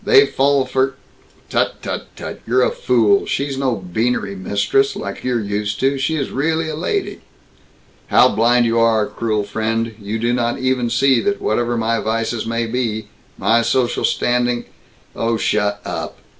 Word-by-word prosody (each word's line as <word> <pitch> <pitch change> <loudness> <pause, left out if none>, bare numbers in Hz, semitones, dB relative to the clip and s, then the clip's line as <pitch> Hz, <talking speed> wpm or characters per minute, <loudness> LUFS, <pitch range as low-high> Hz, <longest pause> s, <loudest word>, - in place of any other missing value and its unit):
They 425 -2 +6
fall 140 - +2
for 130 +1 0 0.3
" - - -31
"Tut, - - 0
tut, - - -4
tut! - - -7
You're - - +3
a - - +2
fool. 410 -4 +2
She's 140 - -1
no 130 -3 0
beanery 100 +2 -2
mistress, 100 - +1
like - - -6
you're 125 -2 0
used 105 +1 -2
to. 135 +1 +1
She 160 +4 0
really 160 +5 -1
is 160 - -3
a - - -4
lady." 390 - -2 0.9
"How - - +6
blind 120 +2 +3
you 115 0 +2
are, 115 -2 +3
cruel 110 -1 -2
friend. 110 +2 -2
You 105 +2 -3
do 120 +2 0
not 120 -1 0
even 130 -2 0
see 130 +1 +3
that 205 0 0
whatever 120 +2 0
my 115 0 0
vices 115 +1 -2
may 115 0 -1
be, 115 -2 -2 0.3
my 110 +4 +3
social 120 +1 0
standing 120 0 +1 0.3
" - - -32
"Oh 115 0 0
shut 105 -1 0
up! - - -5
120 Hz, 170 wpm, -19 LUFS, 110-135 Hz, 0.9 s, They